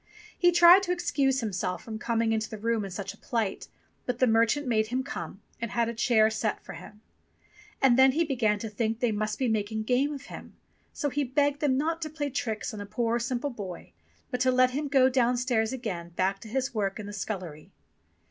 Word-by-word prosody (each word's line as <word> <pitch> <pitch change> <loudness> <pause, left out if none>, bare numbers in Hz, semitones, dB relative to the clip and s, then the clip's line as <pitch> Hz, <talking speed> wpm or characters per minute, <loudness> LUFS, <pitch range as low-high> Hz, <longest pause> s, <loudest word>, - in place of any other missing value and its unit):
He 355 -1 +4
tried 345 +2 +8
to 370 -2 -2
ex 350 -1 -2
cuse 270 -3 +2
himself 185 -4 -3
from 220 -1 -6
coming 230 0 0
into 220 -1 -1
the 220 - -6
room 225 0 0
in 195 - -5
such 195 +1 -5
a - - -19
plight, 225 -6 -2 0.4
but 250 -1 -1
the 255 - +4
merchant 230 +5 +2
made 220 -3 +1
him 255 +3 -1
come, 195 - -7 0.2
and 230 - -2
had 235 0 0
a - - -3
chair 225 -1 +3
set 220 -1 -1
for - - -8
him. 210 - -12 0.8
And 265 -2 +6
he 265 +3 +5
then 335 - +1
began 230 -7 +1
to 225 - -5
think 220 +1 -2
they 245 -2 +1
must 215 0 -2
be 260 - 0
making 220 0 -1
game 255 +5 +1
of 280 -2 -7
him, - - -11 0.4
so 290 -2 -2
he 290 +2 0
begged 285 +2 +1
them 280 -3 +2
not 325 +3 -1
to 310 - -3
play 290 -2 -4
tricks 225 -2 -3
on 210 - -6
a 205 - -7
poor 230 +2 0
simple 245 +4 -2
boy, 195 -7 -8 0.4
but 250 - -2
to 260 +1 +3
let 255 0 +4
him 290 +3 -2
go 270 -2 +5
downstairs 245 -3 +1
again 205 -10 -5
back 190 +2 0
to 225 - -11
his 260 +3 -2
work 200 -3 -2
in 210 - -6
the 205 - -7
scullery. 185 -7 -6
235 Hz, 225 wpm, -28 LUFS, 215-265 Hz, 0.8 s, tried